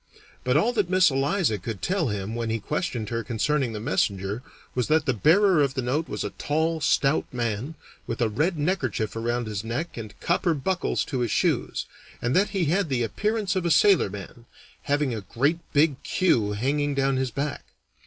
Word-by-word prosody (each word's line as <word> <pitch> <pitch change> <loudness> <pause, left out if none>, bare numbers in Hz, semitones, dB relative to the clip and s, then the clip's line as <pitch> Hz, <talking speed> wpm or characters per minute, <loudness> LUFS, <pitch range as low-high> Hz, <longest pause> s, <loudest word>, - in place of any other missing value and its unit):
But 125 +3 +2
all 230 +10 +2
that 205 -6 0
Miss 185 -3 +5
Eliza 135 - +1
could 100 0 -6
tell 180 -4 +1
him 105 -1 -3
when 115 -1 -2
he 115 0 -1
questioned 120 - -3
her 115 0 -2
concerning 125 +4 0
the 110 - -5
messenger 100 +1 -1 0.3
was 125 -2 0
that 155 -1 +3
the 130 - +2
bearer 170 - +4
of 140 -2 +1
the 130 - -1
note 145 +7 -1
was - - -3
a - - -3
tall, 160 +2 -1
stout 140 0 +2
man, 120 +4 -3 0.3
with 115 - -3
a 120 - +3
red 155 - 0
neckerchief 140 - -1
around 120 +1 -1
his 105 -2 -4
neck 125 +10 -4
and 110 -3 -8
copper 170 -1 +1
buckles 175 +6 -1
to 130 - -3
his 120 -2 0
shoes, - - 0 0.3
and 120 +2 -1
that 200 +3 +3
he 190 -4 0
had 175 +3 +1
the 125 -3 +1
appearance 210 - -1
of 185 - 0
a 170 - 0
sailorman, 120 - +2 0.4
having 145 -3 +1
a 110 - -4
great 140 - 0
big 145 -2 +2
queue 115 - +1
hanging 140 +6 0
down 135 -1 +1
his 130 -1 0
back. 140 +3 -3
135 Hz, 195 wpm, -25 LUFS, 115-165 Hz, 0.4 s, Miss